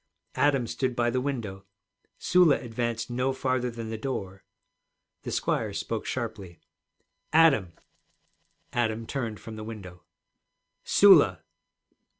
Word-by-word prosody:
Adam 140 Hz, -4 st, +2 dB
stood 130 Hz, +1 st, -2 dB
by 120 Hz, -1 st, +1 dB
the 130 Hz, +1 st, 0 dB
window; 115 Hz, -8 st, -4 dB, 0.5 s
Sula 175 Hz, -5 st, +4 dB
advanced 115 Hz, -1 st, -3 dB
no 125 Hz, +2 st, 0 dB
farther 130 Hz, -1 st, -1 dB
than 115 Hz, -1 st, -7 dB
the 110 Hz, -, -5 dB
door. 95 Hz, -7 st, -5 dB, 0.8 s
The -, -, -6 dB
squire -, -, -1 dB
spoke -, -, -4 dB
sharply. 90 Hz, -4 st, -5 dB, 0.7 s
'Adam!' 140 Hz, -, +4 dB, 1.0 s
Adam 115 Hz, -1 st, -1 dB
turned 115 Hz, -5 st, -4 dB
from 110 Hz, -1 st, -9 dB
the 110 Hz, -, -6 dB
window. 95 Hz, -5 st, -9 dB, 0.8 s
'Sula!' -, -, +6 dB
120 Hz, 115 wpm, -27 LUFS, 110-130 Hz, 1.0 s, Sula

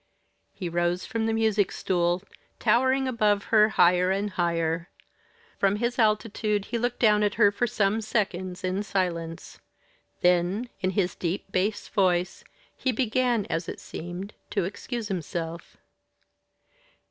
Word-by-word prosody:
He 185 Hz, -, -5 dB
rose 175 Hz, +1 st, 0 dB
from 225 Hz, -1 st, -2 dB
the -, -, +1 dB
music 220 Hz, -3 st, +2 dB
stool 175 Hz, 0 st, 0 dB, 0.3 s
towering 260 Hz, +4 st, +2 dB
above 210 Hz, -5 st, +2 dB
her 215 Hz, 0 st, +6 dB
higher 180 Hz, -2 st, +4 dB
and 200 Hz, +2 st, 0 dB
higher. 170 Hz, -1 st, -1 dB, 0.7 s
From 195 Hz, 0 st, +3 dB
his 240 Hz, +3 st, -2 dB
altitude 215 Hz, -1 st, +1 dB
he 235 Hz, -, -2 dB
looked 245 Hz, +2 st, -1 dB
down 210 Hz, -3 st, +4 dB
at 205 Hz, -1 st, +1 dB
her 205 Hz, -2 st, +5 dB
for 240 Hz, +4 st, 0 dB
some 210 Hz, 0 st, +1 dB
seconds 190 Hz, -4 st, -2 dB
in 185 Hz, +2 st, -1 dB
silence. 170 Hz, -5 st, -3 dB, 0.6 s
Then, 180 Hz, +6 st, +2 dB
in 185 Hz, -1 st, 0 dB
his 185 Hz, -3 st, +1 dB
deep 185 Hz, +3 st, -4 dB
bass 205 Hz, +3 st, 0 dB
voice, 180 Hz, -2 st, +1 dB, 0.3 s
he 260 Hz, -, 0 dB
began, 240 Hz, -2 st, +1 dB
as 165 Hz, +1 st, -3 dB
it -, -, -6 dB
seemed, 175 Hz, +4 st, -7 dB, 0.2 s
to 200 Hz, -, 0 dB
excuse 225 Hz, +4 st, -5 dB
himself. 170 Hz, -3 st, -5 dB
200 Hz, 135 wpm, -26 LUFS, 180-220 Hz, 0.7 s, her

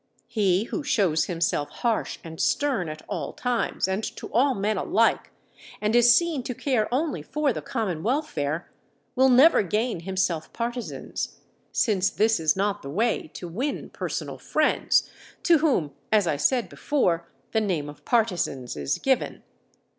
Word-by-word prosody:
He 195 Hz, -3 st, +2 dB
who 295 Hz, +7 st, -4 dB
shows 180 Hz, -, +2 dB
himself 165 Hz, -4 st, -1 dB
harsh 230 Hz, +7 st, -1 dB
and 160 Hz, -2 st, -6 dB
stern 265 Hz, -, +1 dB
at 155 Hz, 0 st, -8 dB
all 150 Hz, -5 st, -4 dB
times 245 Hz, -6 st, -1 dB
and 190 Hz, +3 st, -1 dB
to -, -, -9 dB
all 260 Hz, +2 st, +3 dB
men 210 Hz, +2 st, 0 dB
alike, 225 Hz, +4 st, +2 dB, 0.5 s
and 210 Hz, +2 st, 0 dB
is 240 Hz, 0 st, +7 dB
seen 340 Hz, -5 st, +1 dB
to 250 Hz, 0 st, -5 dB
care 240 Hz, -6 st, 0 dB
only 290 Hz, +5 st, 0 dB
for 300 Hz, -3 st, 0 dB
the -, -, -4 dB
common 200 Hz, -10 st, -2 dB
welfare, 175 Hz, -, -2 dB, 0.4 s
will 265 Hz, 0 st, +5 dB
never 265 Hz, +5 st, +7 dB
gain 210 Hz, +2 st, -1 dB
himself 175 Hz, -3 st, -1 dB
partisans, 240 Hz, 0 st, -4 dB, 0.3 s
since 200 Hz, -4 st, +2 dB
this 220 Hz, 0 st, +2 dB
is 155 Hz, -2 st, +2 dB
not 200 Hz, +1 st, 0 dB
the 140 Hz, -, -7 dB
way 220 Hz, +8 st, 0 dB
to 175 Hz, -, -6 dB
win 250 Hz, -, -3 dB
personal -, -, -4 dB
friends, -, -, +2 dB, 0.4 s
to 335 Hz, -3 st, +5 dB
whom, 255 Hz, -, +1 dB, 0.2 s
as 215 Hz, -3 st, +4 dB
I 155 Hz, -, +1 dB
said 240 Hz, -, +1 dB
before, 175 Hz, -, 0 dB, 0.2 s
the 220 Hz, -, +2 dB
name 175 Hz, -8 st, -1 dB
of 145 Hz, -, -11 dB
partisans 180 Hz, -, 0 dB
is 70 Hz, -2 st, -1 dB
given. 265 Hz, -1 st, 0 dB
215 Hz, 155 wpm, -25 LUFS, 170-250 Hz, 0.5 s, is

